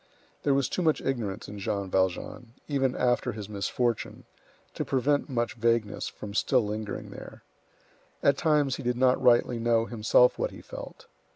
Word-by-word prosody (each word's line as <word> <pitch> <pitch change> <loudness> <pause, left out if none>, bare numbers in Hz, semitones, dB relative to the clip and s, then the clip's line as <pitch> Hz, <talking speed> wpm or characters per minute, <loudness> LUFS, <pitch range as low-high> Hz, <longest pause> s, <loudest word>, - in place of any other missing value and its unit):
There 140 -2 +2
was 140 -2 +2
too - - -2
much 160 -3 +2
ignorance 110 -6 -3
in 105 0 -8
Jean 100 0 -2
Valjean, 95 +5 -1
even 135 -3 0
after 125 -1 +1
his 105 -2 -7
misfortune, 105 +3 -2 0.5
to - - -2
prevent 145 +3 +1
much 120 -3 -1
vagueness 115 -2 0
from 100 -1 -8
still 125 +2 +2
lingering 105 0 -5
there. - - -11 0.8
At 140 - +5
times 145 -3 +2
he - - -6
did 125 -1 -1
not 130 0 +3
rightly 120 -1 +4
know 115 -1 +2
himself 115 +2 +3
what - - 0
he - - -12
felt. - - -10
120 Hz, 165 wpm, -28 LUFS, 105-130 Hz, 0.8 s, At